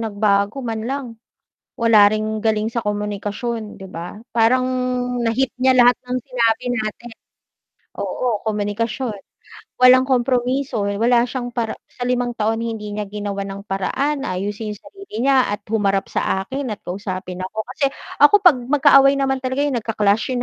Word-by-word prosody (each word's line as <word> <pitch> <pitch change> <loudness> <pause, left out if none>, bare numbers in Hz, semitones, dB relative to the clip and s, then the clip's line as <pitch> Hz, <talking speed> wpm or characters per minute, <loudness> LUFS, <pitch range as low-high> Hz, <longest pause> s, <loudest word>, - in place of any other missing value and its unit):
nagbago 205 +2 0
man 225 -2 -3
lang 275 0 -3 0.7
wala 220 -3 +6
ring 215 0 -2
galing 215 -1 +1
sa 235 - -1
komunikasyon 210 +2 -3
diba, 185 +1 -8 0.2
parang 240 +3 +3 0.6
nahit 245 +3 +1
niya 260 0 +4
lahat 245 0 +6
ng 250 0 -1
sinabi 240 -3 0
natin. 235 0 -4 0.9
oo, 240 -4 -1
komunikasyon, 215 +2 -2 0.6
walang 255 +1 +7
kompromiso 255 -1 0
wala 230 +4 +2
siyang 245 -1 -4
para 230 -2 -2
sa - - -11
limang 245 -1 0
taon 220 0 0
hindi 225 -2 -4
niya 210 0 -3
ginawa 200 -1 -4
ng 195 0 -7
paraan 275 +9 -1
ayusin 205 +4 -3
yung 205 - -16
sarili 395 - -14
niya 265 -1 +3
at 205 - -9
humarap 200 -3 +1
sa 190 - 0
akin 270 +7 -5
at - - -25
kausapin 185 -1 -5
ako 220 +3 -4
kasi 280 - +2 0.3
ako 290 +7 +6
pag 350 -9 +6
magkaaway 275 +1 +5
naman 270 -1 0
talaga 260 +2 -2
yung 290 -3 0
nagka-clash 215 +2 0
yung 245 - -1
225 Hz, 150 wpm, -20 LUFS, 205-255 Hz, 0.9 s, walang